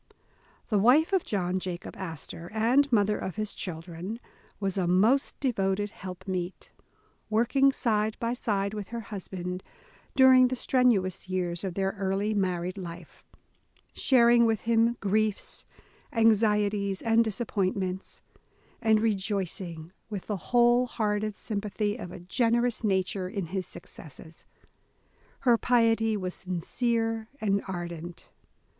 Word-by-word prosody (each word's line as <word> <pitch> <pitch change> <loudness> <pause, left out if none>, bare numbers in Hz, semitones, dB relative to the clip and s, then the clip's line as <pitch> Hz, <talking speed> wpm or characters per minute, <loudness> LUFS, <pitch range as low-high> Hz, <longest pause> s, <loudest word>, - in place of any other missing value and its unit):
The 210 -3 +3
wife 275 - +4
of 380 - +3
John 185 -2 -1
Jacob 180 -1 -5
Astor, 165 -1 -6
and 255 +6 +3
mother 210 -2 +3
of 190 - -4
his 215 -1 -3
children, 175 +5 -6 0.4
was 195 -2 -1
a 185 -3 0
most 215 +10 +3
devoted 205 -5 0
helpmeet, 185 -1 -6 0.6
working 240 +5 +3
side 220 -5 0
by 235 0 -1
side 200 -4 -1
with 210 -3 -5
her 235 0 -5
husband 185 -3 -5 0.5
during 260 -1 +7
the 255 - -2
strenuous 215 -9 +1
years 180 -1 -1
of 185 -3 -3
their 195 0 0
early 195 +2 0
married 185 -2 -1
life, 170 -2 -9 0.7
sharing 235 -2 +5
with 220 -2 0
him 230 +1 +2
griefs, 210 +1 -1 0.4
anxieties, 210 -3 +2
and 230 0 +4
disappointments; 195 -4 -2 0.6
and 220 -2 +4
rejoicing, 190 -6 -2 0.2
with 205 -4 -5
the 210 - -2
whole 240 +1 +4
hearted 215 -2 -1
sympathy 210 -1 -2
of 180 -7 -7
a - - -8
generous 235 +6 +1
nature, 190 -2 0
in 195 -2 -3
his 190 -2 -2
successes. 160 +2 -8 0.9
Her 240 -3 +4
piety 225 -2 +3
was 185 -2 -3
sincere 225 +5 -1
and 200 -2 +1
ardent. 175 -2 -6
205 Hz, 125 wpm, -28 LUFS, 185-230 Hz, 0.9 s, during